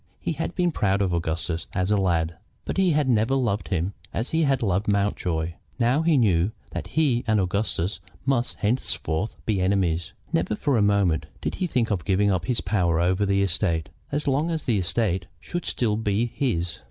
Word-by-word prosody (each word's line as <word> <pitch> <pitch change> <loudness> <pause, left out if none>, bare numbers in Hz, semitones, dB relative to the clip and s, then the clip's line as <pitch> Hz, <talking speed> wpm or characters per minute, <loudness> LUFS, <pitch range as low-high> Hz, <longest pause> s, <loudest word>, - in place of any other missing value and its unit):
He - - -2
had 165 +2 -3
been 175 -1 +2
proud 100 -8 +1
of 90 -2 0
Augustus 80 0 -2
as 90 +2 0
a - - +5
lad, 85 -4 +1 0.3
but - - -3
he 190 -1 +4
had 150 -3 +2
never 120 +1 +3
loved 105 -9 0
him 90 +3 -1 0.2
as 115 - -3
he 160 - +2
had 135 -5 +2
loved 100 0 +1
Mountjoy. 90 -5 0 0.2
Now 125 +4 +3
he 165 -2 +3
knew 100 -4 +3 0.2
that - - -4
he 135 -6 +1
and 110 -1 +3
Augustus 95 -1 -1 0.3
must 130 -3 +1
henceforward 105 -5 -1
be 105 -4 +1
enemies. 90 -3 +1 0.2
Never 90 +6 +1
for 140 +5 +1
a 110 - +3
moment 100 -6 +2
did - - -3
he 180 - +2
think 120 -7 0
of 95 -5 0
giving 100 +2 +2
up 90 -3 0
his 125 -2 0
power 90 -4 +1
over 95 +4 +2
the 100 0 +2
estate 85 -5 0 0.2
as 145 +1 -1
long 145 +5 +2
as 160 -2 -2
the 110 -5 +1
estate 95 -1 0
should 175 -1 -5
still 110 -4 0
be 110 +1 +1
his. 90 -9 -1
100 Hz, 195 wpm, -25 LUFS, 90-125 Hz, 0.3 s, a